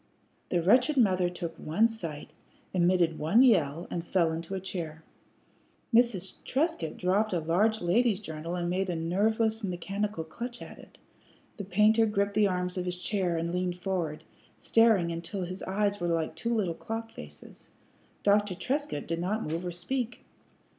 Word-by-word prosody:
The 175 -2 +1
wretched 250 - +4
mother 185 -7 +3
took 175 -2 -6
one 200 +9 +2
sight, 165 -10 -7 0.4
emitted 175 -2 +2
one 195 +12 +5
yell, 170 - +3
and 170 - -2
fell 170 -2 +1
into 165 +4 -4
a - - -2
chair. 165 -4 -6 0.9
Mrs. 225 -6 +2
Trescott 275 - -1
dropped 195 +3 +1
a 175 - +1
large 195 +8 +1
lady's 205 +4 +2
journal 165 -3 -5
and 175 -1 -2
made 185 +2 -1
a 175 - -1
nerveless 220 +7 +1
mechanical 195 +1 -3
clutch 240 +9 -7
at - - -10
it. - - -16 0.6
The 200 - -5
painter 215 +4 +4
gripped 200 -1 0
the 210 -1 +4
arms 180 -1 -2
of 180 - -3
his 180 0 -3
chair 180 -3 0
and 165 +1 -2
leaned 180 -1 -1
forward, 175 -5 -2 0.3
staring 200 - +3
until 170 +3 -4
his 185 +2 -6
eyes 205 +1 0
were 175 - -1
like 165 -2 0
two 230 +8 -2
little 190 -6 0
clock 225 +5 -5
faces. 75 0 -12 0.6
Dr. 205 -2 +3
Trescott 275 - -2
did 165 0 -2
not 205 +6 -1
move 165 +3 -3
or 180 - -3
speak. 240 +8 -4
185 Hz, 165 wpm, -29 LUFS, 170-215 Hz, 0.9 s, one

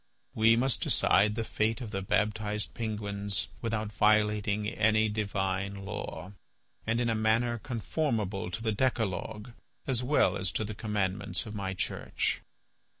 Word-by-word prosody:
We 115 -2 +5
must 125 +2 +2
decide 105 +2 +3
the 115 - -1
fate 110 0 0
of 115 -5 -6
the 95 -2 -2
baptized 105 +1 0
penguins 100 -5 -2
without 110 -2 -2
violating 105 -1 +2
any 110 0 +3
divine 100 -2 -2
law, 100 -3 -5 0.5
and 115 +1 +1
in 120 - +1
a 115 - +2
manner 115 +2 +2
conformable 110 - -2
to 110 +5 -4
the 110 - +1
decalogue 110 -1 -1 0.3
as 130 -3 +1
well 140 +4 +3
as 95 -1 -1
to - - 0
the 105 0 -4
commandments 100 -3 -1
of 105 - -7
my 95 -2 -3
Church." - - -1
105 Hz, 145 wpm, -30 LUFS, 100-115 Hz, 0.5 s, We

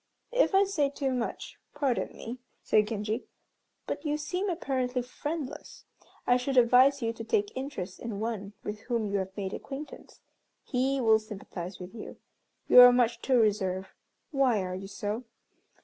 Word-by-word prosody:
"If - - +3
I 390 - +7
say 320 -8 +1
too 275 -1 -2
much, 245 -2 -4 0.2
pardon 275 -5 0
me," 240 +3 -7 0.2
said 210 -1 +3
Genji, 215 +2 -3 0.6
"but - - -4
you 300 -1 0
seem 360 +6 -2
apparently 260 -7 -1
friendless. 290 +3 -6 0.4
I 245 - +4
should 260 +1 -2
advise 255 +3 +6
you 230 0 0
to 225 - -7
take 410 - 0
interest 260 -9 -5
in 225 -4 -5
one 210 -3 -4
with 210 0 -5
whom 235 -1 -2
you 200 - +1
have 190 +1 -5
made 195 -1 -3
acquaintance. 280 +2 -8 0.4
He 265 +1 0
will 220 -3 +5
sympathize 195 -4 -8
with 180 +2 -9
you. 225 - -9 0.5
You - - +8
are 245 0 +11
much 240 -1 +2
too 260 -2 +3
reserved. 190 -3 +1 0.4
Why 260 -8 +2
are 185 0 -4
you 190 +1 -6
so? 205 +4 -4
245 Hz, 165 wpm, -29 LUFS, 210-275 Hz, 0.6 s, are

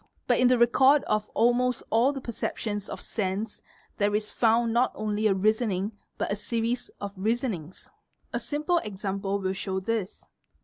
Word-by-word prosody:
But - - +2
in 250 - +5
the 250 0 +4
record 265 +4 +5
of 210 0 -1
almost 245 +2 +2
all 235 +5 +4
the 275 -2 -6
percep 235 -3 -4
tions 205 -2 -3
of - - -5
sense 205 +1 -3 0.4
there 205 0 +2
is 210 0 -1
found 230 0 +3
not 240 +2 +3
only 215 0 0
a 195 - +3
reasoning 210 0 +1 0.3
but - - -2
a - - +1
series 230 +3 -2
of 200 -1 -4
reasonings. 200 - -2 0.5
A - - 0
simple 305 +4 0
example 195 -2 -3
will 190 -1 -1
show 190 0 -2
this. 210 0 -3
215 Hz, 170 wpm, -27 LUFS, 200-240 Hz, 0.5 s, in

